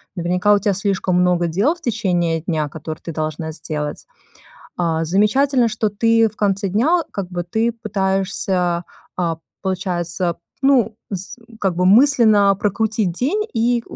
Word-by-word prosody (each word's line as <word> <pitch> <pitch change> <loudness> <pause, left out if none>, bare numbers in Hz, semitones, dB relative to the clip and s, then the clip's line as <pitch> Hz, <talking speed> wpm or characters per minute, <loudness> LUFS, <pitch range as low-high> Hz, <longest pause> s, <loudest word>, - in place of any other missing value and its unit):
Наверняка 180 +3 +2
у 205 - +4
тебя 200 0 +1
слишком 195 -1 -1
много 180 -1 +2
дел 200 - +1
в 340 - -22
течение 175 - 0
дня, 155 -3 -2
которые 155 +1 -7
ты 165 - -6
должна 155 +1 -3
сделать. 150 -1 -5 0.7
А, 165 -2 0
замечательно, 235 - +2
что 215 0 -1
ты 225 +2 +3
в 215 - -19
конце 200 -1 0
дня, 295 - +2
как 195 -3 -4
бы, 175 -1 -3
ты 220 +7 0
пытаешься, 190 -4 -1 0.3
а, 170 -3 -1 0.3
получается, 180 -2 -2 0.3
ну, 245 -6 +3 0.2
с 190 +4 -5 0.2
как 190 -3 0
бы 180 +1 +2
мысленно 215 -3 +5
прокрутить 210 -1 0
день, 295 - 0
и, 235 0 +1
195 Hz, 145 wpm, -20 LUFS, 175-220 Hz, 0.7 s, мысленно